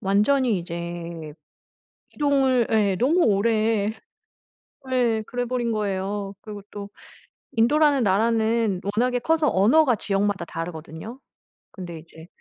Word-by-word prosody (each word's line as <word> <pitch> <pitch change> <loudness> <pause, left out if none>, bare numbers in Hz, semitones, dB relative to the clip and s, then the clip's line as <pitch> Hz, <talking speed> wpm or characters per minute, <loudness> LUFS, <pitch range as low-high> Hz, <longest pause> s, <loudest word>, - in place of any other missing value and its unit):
완전히 210 +4 +2
이제 170 -2 -6 0.8
이동을 270 -5 +2
예 205 -3 +2
너무 305 +9 +3
오래 215 0 +2 1.0
예 235 -3 +2
그래 245 0 -3
버린 240 -1 -1
거예요. 200 -1 -2
그리고 205 -2 -9
또 205 -1 -7 0.7
인도라는 280 +3 +3
나라는 220 0 +1
워낙에 250 +2 +1
커서 320 +3 +1
언어가 245 +7 +4
지역마다 200 -3 -1
다르거든요? 165 - -7 0.5
근데 175 -4 -8
이제 160 0 -15
215 Hz, 255 characters per minute, -24 LUFS, 190-245 Hz, 1.0 s, 언어가